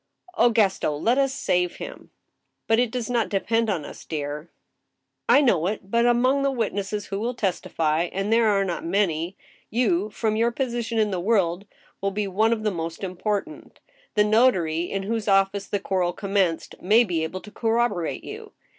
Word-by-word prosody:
Oh, 240 - +5
Gaston 210 -7 +2
I - - -2
let 230 - +1
us 270 -1 +2
save 180 -8 0
him! - - -9 0.2
" - - -53
" - - -54
But 225 +1 +3
it 245 -1 +2
does 240 0 -3
not 235 -3 0
depend 225 +3 0
on 170 -7 -1
us, - - -10
dear." 150 +1 -5 0.4
" - - -29
I 285 - +7
know 185 - +3
it; 200 -1 -4
but 235 +1 +3
among 255 +3 +3
the 275 - +2
witnesses 210 -4 -2
who 195 0 -4
will 235 +3 -2
testify 170 -5 0
(and 195 +3 -1
there 230 -1 +4
are 200 -2 +2
not 175 -3 -3
many), 175 -1 0 0.3
you, 210 -4 +1
from 215 0 -1
your 230 +2 +2
position 240 -2 -2
in 215 -2 +2
the 185 - -1
world, 190 -1 +1 0.3
will 195 - +1
be 205 +1 -2
one 215 +4 +2
of 225 -2 -1
the 210 - +1
most 165 0 -5
important 200 - -4 0.4
The 210 - +5
notary, 200 -8 +3
in 195 0 -2
whose 220 +1 -2
office 195 0 +2
the 205 - -1
quarrel 185 -2 0
com 200 +1 -6
menced, 185 -5 0
may 215 +6 +5
be 175 -7 -1
able 185 +4 -4
to 210 - -12
corroborate 225 -7 0
you. - - -9
205 Hz, 200 wpm, -24 LUFS, 180-230 Hz, 0.4 s, I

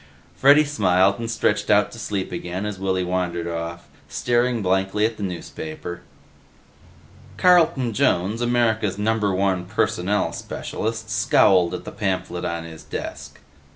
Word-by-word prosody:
Freddy 145 +3 +6
smiled 100 -7 +2
and 115 -1 -4
stretched 110 -2 0
out 105 -1 +4
to 115 - -10
sleep 100 -4 -3
again 90 +2 -4
as 105 -3 -4
Willy 95 -1 0
wandered 90 -2 -2
off, 85 0 -5 0.2
staring 120 -2 0
blankly 95 +3 +1
at 110 0 -2
the - - -9
newspaper. 85 -2 -6 1.4
Carlton 160 -10 +4
Jones, 100 +3 +1
America's 115 -4 +1
Number 105 -1 +1
One 95 -2 0
personnel 105 -1 0
specialist, 110 -1 -5
scowled 95 -3 +4
at - - -7
the - - -6
pamphlet 95 -2 -2
on 85 0 -3
his 80 -1 -10
desk. 70 0 -7
100 Hz, 135 wpm, -23 LUFS, 90-110 Hz, 1.4 s, Freddy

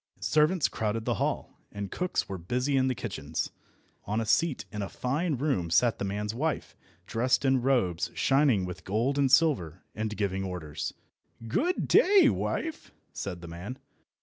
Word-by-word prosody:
Servants 155 +2 +3
crowded 110 +1 -2
the - - +1
hall, - - -2
and 100 -2 -5
cooks 180 0 -1
were 95 -2 -5
busy 125 +11 -1
in 130 -1 +3
the 130 - 0
kitchens. 80 -10 -4 0.5
On 105 +3 -1
a 115 - -1
seat 160 +5 +1
in 105 - -4
a 100 - -3
fine 150 +5 -1
room 125 - 0
sat 115 +7 +3
the - - -2
man's 105 +2 -2
wife, 155 +6 -2 0.3
dressed 125 +4 +1
in 130 -1 +3
robes 120 -10 +1
shining 135 -8 +3
with 90 0 -7
gold 120 +9 0
and 135 -2 +3
silver, 130 - +3
and 110 0 -3
giving 95 -2 -1
orders. 80 -5 -5 0.5
"Good 345 - 0
day, 395 0 +6
wife!" 320 -1 -3 0.2
said 90 -3 -5
the 85 - -8
man. 90 +10 -7
115 Hz, 165 wpm, -29 LUFS, 95-140 Hz, 0.5 s, day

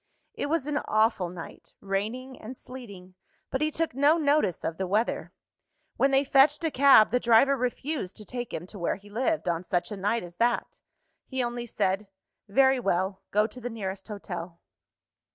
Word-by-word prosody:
It - - -3
was 305 -2 0
an 295 0 0
awful 215 -4 +2
night, 170 -2 -10
raining 220 +7 -3
and 245 +4 -8
sleeting 200 -8 -11 0.4
but 265 - -1
he 305 - +2
took 325 -1 -2
no 285 +5 +4
notice 290 - +1
of 165 - -3
the 190 - -1
weather. 215 +5 0 0.6
When 275 - +3
they 270 0 +4
fetched 285 +3 +4
a 320 - +1
cab, 270 -6 +6
the 250 - +3
driver 240 +4 +5
refused 250 - -3
to 210 - -9
take 245 +2 -5
him 170 - -5
to 200 +2 -11
where 170 - 0
he 205 +1 -16
lived, 260 - 0
on 170 0 0
such 175 +3 -1
a 205 - -4
night 205 +4 0
as 175 0 -11
that. 240 +1 0 0.5
He 260 -2 -1
only 240 0 -4
said, 195 -1 -1 0.4
"Very 265 +5 +4
well; 190 -2 -1
go 210 +1 +3
to 250 +3 -8
the 245 - -4
nearest 195 -4 -5
hotel." 180 -5 -7
230 Hz, 185 wpm, -27 LUFS, 195-270 Hz, 0.6 s, cab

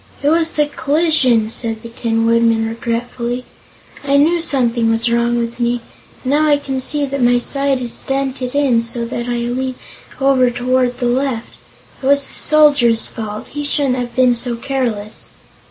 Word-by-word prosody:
"It 290 - +3
was 330 0 +2
the 300 - +2
collision," 285 -5 +2
said 225 -1 -3
the 230 - -8
Tin 225 -1 -1
Woodman 230 -1 +2
regretfully. 235 +2 -3 0.6
"I 280 0 +2
knew 330 +4 +3
something 240 -7 +1
was 225 +1 +1
wrong 235 0 +1
with 235 +1 -3
me, 240 0 0 0.4
and 260 - -1
now 305 +2 +3
I 290 -1 +4
can 270 -2 -4
see 290 +2 +1
that 275 0 -4
my 245 0 +4
side 275 +1 0
is 235 - -3
dented 270 -1 -3
in 265 -5 +3
so 235 0 0
that 235 0 -4
I 240 - -1
lean 250 +2 -2 0.4
over 270 -2 +3
toward 245 +1 0
the 245 - -2
left. 245 -1 -1 0.5
It 265 - -3
was 280 0 +3
the - - -4
Soldier's 285 -7 +4
fault; 215 -1 -7
he 290 0 -5
shouldn't 285 -3 0
have 240 -1 -5
been 255 -1 +4
so 240 0 -1
careless." 235 -5 -3
250 Hz, 175 wpm, -17 LUFS, 235-275 Hz, 0.6 s, I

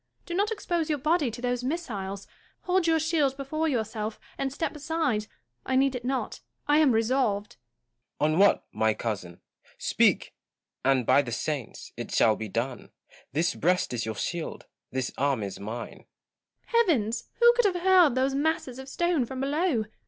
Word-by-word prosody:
Do 345 - -5
not 405 +4 +1
expose 345 -7 -2
your 300 - +1
body 305 0 +1
to 240 +2 -8
those 245 0 -1
missiles. 205 - -4 0.4
Hold 365 -1 +1
your 325 0 +4
shield 305 -4 +1
before 310 +4 -2
yourself, 220 -5 -2 0.2
and 270 -1 -2
step 315 +3 -3
aside. 300 -8 -1 0.4
I 260 - -1
need 270 0 +3
it 250 -2 -5
not. 260 +1 -2 0.3
I 295 +1 +5
am 300 -4 +5
resolved 225 -3 0 0.6
Gaunt. 155 +1 +2
On 165 - +1
what, 200 0 +4
my 110 -1 +1
cousin? 95 -6 -5 0.4
Speak, - - +2 0.5
and, 130 -2 +3
by 130 +4 +5
the 125 -4 -6
saints! 140 0 -4
it - - -5
shall 110 -1 +4
be 110 -1 -6
done. 120 +5 -3 0.4
This 160 +6 +1
breast 180 -4 +1
is 120 -1 -1
your 110 - -3
shield; 170 - -4 0.2
this 130 -1 -2
arm 135 -5 +1
is 100 - -6
mine. 115 +4 -7 0.6
Joanna. 465 - +3
Heavens! 230 - 0
who 475 0 +7
could 485 -1 +2
have 360 -3 +1
hurled 365 -8 +6
those 265 +1 +1
masses 280 -3 -1
of 265 +1 -8
stone 345 -2 +1
from 260 +1 -6
below 285 -2 +1
255 Hz, 175 wpm, -27 LUFS, -, 0.6 s, who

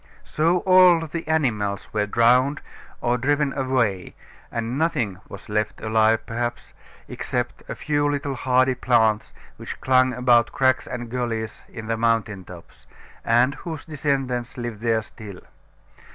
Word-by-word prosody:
So 170 +3 +1
all 185 -3 +6
the 165 +1 -6
animals 110 -11 -1
were 105 -1 0
drowned 125 +6 +3 0.4
or 120 +1 +1
driven 145 +2 +1
away, 125 -9 -1 0.4
and 115 +1 -3
nothing 140 - -1
was 100 - -10
left 105 0 -2
alive 110 0 +2
perhaps, 120 +1 -4 0.3
except - - -4
a - - -4
few 145 -1 0
little 145 -1 -2
hardy 130 0 +2
plants 110 -3 +1 0.3
which - - -8
clung 130 0 +3
about 120 -1 +3
cracks 130 -1 +1
and 120 -2 -6
gullies 115 -3 -3
in 110 - -8
the 115 0 -1
mountain 115 -4 0
tops; 90 -2 -14 0.4
and 120 +4 +3
whose 160 -1 -7
descendants 135 -6 -2
live 120 -3 -5
there 115 -1 +1
still. 105 -4 -11
120 Hz, 140 wpm, -23 LUFS, 110-140 Hz, 0.4 s, all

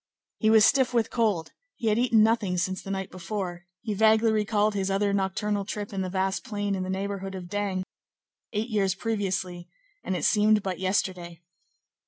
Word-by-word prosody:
He 220 - +3
was 220 -1 +7
stiff 260 -3 +3
with 230 -2 +1
cold; 210 -9 0 0.2
he 225 - -1
had 215 +2 +2
eaten 235 -3 +4
nothing 215 -5 +1
since 185 +1 -1
the - - -9
night 195 -1 -3
before; 175 -1 -5
he 215 - -3
vaguely 220 +2 +4
recalled 215 0 +1
his 195 -1 -1
other 200 +1 +1
nocturnal 200 +1 0
trip 205 +1 -5
in 195 - -2
the 185 - -2
vast 190 +1 -1
plain 205 -2 -2
in 190 - -2
the 185 - -4
neighborhood 195 0 -3
of 180 -2 -7
D——, 200 -2 -1 0.7
eight 220 +2 -2
years 195 -3 +1
previously, 190 -4 -3 0.3
and 185 - -2
it - - -1
seemed 210 0 +4
but 185 -2 -3
yesterday. 180 -3 -2
200 Hz, 185 wpm, -27 LUFS, 185-215 Hz, 0.7 s, was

